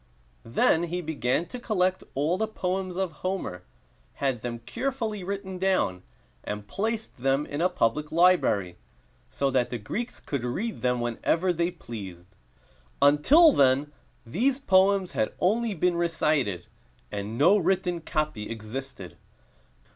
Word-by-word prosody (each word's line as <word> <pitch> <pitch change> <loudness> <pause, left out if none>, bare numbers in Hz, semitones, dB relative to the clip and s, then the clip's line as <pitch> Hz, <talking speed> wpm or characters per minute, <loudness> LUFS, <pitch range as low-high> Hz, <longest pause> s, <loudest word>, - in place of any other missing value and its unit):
Then 160 +8 +3
he 175 +1 -3
began 155 -2 -1
to 250 - -6
collect 185 -5 0
all 150 +6 +1
the 220 +3 -1
poems 185 -3 -3
of 190 -3 -1
Homer, 185 - -3 0.5
had 135 -5 -1
them 120 0 -4
carefully 220 - -3
written 190 -1 -5
down, 185 - +1 0.4
and 105 0 -5
placed 220 - -3
them 135 +3 +1
in 145 +2 -4
a 180 - +3
public 150 -1 0
library, 160 - +3 0.5
so 140 -1 -1
that 125 -2 +1
the 120 - -3
Greeks 215 - -5
could 140 -4 -4
read 200 - -3
them 125 -1 +1
whenever 160 +10 0
they 170 +1 0
pleased. 100 - -9 0.7
Until 150 - +6
then 140 - +3 0.3
these 245 - +1
poems 190 -4 +3
had 110 - -1
only 220 +3 +1
been 180 +1 +1
recited, 155 - 0 0.5
and 105 +2 -4
no 175 +9 +6
written 180 -1 0
copy 155 -10 -2
existed. 115 +5 -7
165 Hz, 135 wpm, -27 LUFS, 125-190 Hz, 0.7 s, Until